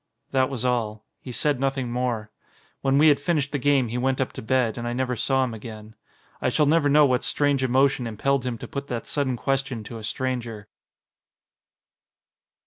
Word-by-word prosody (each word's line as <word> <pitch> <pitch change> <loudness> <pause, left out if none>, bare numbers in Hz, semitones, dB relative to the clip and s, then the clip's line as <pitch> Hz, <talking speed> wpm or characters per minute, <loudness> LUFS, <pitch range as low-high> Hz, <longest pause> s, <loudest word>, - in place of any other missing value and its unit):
That 130 0 +2
was 130 -3 -4
all. 110 -4 -1
He 130 - -8
said 145 +2 0
nothing 135 -2 -1
more. 120 -4 -2 0.5
When 135 0 +2
we 155 +2 +7
had 145 -2 +4
finished 145 -3 0
the 145 - -1
game 135 -3 +2
he 120 +2 -2
went 130 +1 0
up 130 - -1
to - - -7
bed, 120 -1 +1
and 120 - -4
I 120 - -2
never 125 0 -1
saw 135 +3 +1
him 125 -3 -2
again. 110 -1 -9 0.5
I - - +2
shall 150 - +2
never 150 0 +3
know 150 +1 +6
what 125 -3 +1
strange 145 -2 +1
emotion 130 -1 +2
impelled 135 +4 0
him 125 -2 -3
to - - -8
put 140 0 -5
that 120 -3 -4
sudden 135 -4 -1
question 135 -3 -1
to 115 +2 -8
a - - -10
stranger. 115 -2 -3
130 Hz, 195 wpm, -25 LUFS, 120-140 Hz, 0.5 s, we